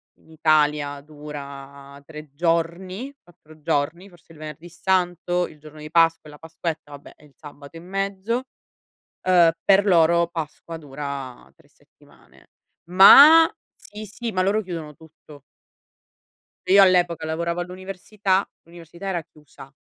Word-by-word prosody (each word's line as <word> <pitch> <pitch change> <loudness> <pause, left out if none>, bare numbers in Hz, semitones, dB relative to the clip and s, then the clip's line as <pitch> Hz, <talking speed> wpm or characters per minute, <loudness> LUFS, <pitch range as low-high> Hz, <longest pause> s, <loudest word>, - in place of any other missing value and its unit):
in - - -27
Italia 150 -2 +1
dura 140 -2 -11
3 150 -2 -12
giorni, 175 - -2
4 155 -2 -21
giorni, 160 +4 -2
forse 175 -2 -22
il 155 - -18
Venerdì 155 +2 -10
Santo, 175 0 -1
il 150 - -17
giorno 155 0 -14
di 155 0 -10
Pasqua 165 -2 +2
e - - -13
la 150 - -15
Pasquetta, 160 -2 -6
vabbè, 145 - -13
e 150 - -21
il 145 - -23
sabato 145 +1 -13
in 170 +2 -13
mezzo, 195 +5 -3 0.8
uhm, 175 -3 +4
per 200 +1 +4
loro 170 -2 +3
Pasqua 165 0 -7
dura 140 -3 -8
3 - - -26
settimane. - - -25 0.4
Ma 285 - +9 0.3
sì 215 +1 -11
sì, 230 +3 -6
ma 185 - -1
loro 205 +3 0
chiudono 165 -6 -8
tutto. 155 -2 -18 1.3
Io 200 +1 +6
all'epoca 175 -4 +2
lavoravo 170 +2 -3
all'università, 190 +2 -3 0.2
l'università 170 +2 -12
era 180 -3 -2
chiusa. 150 -3 -17
165 Hz, 135 wpm, -22 LUFS, 150-185 Hz, 1.3 s, Ma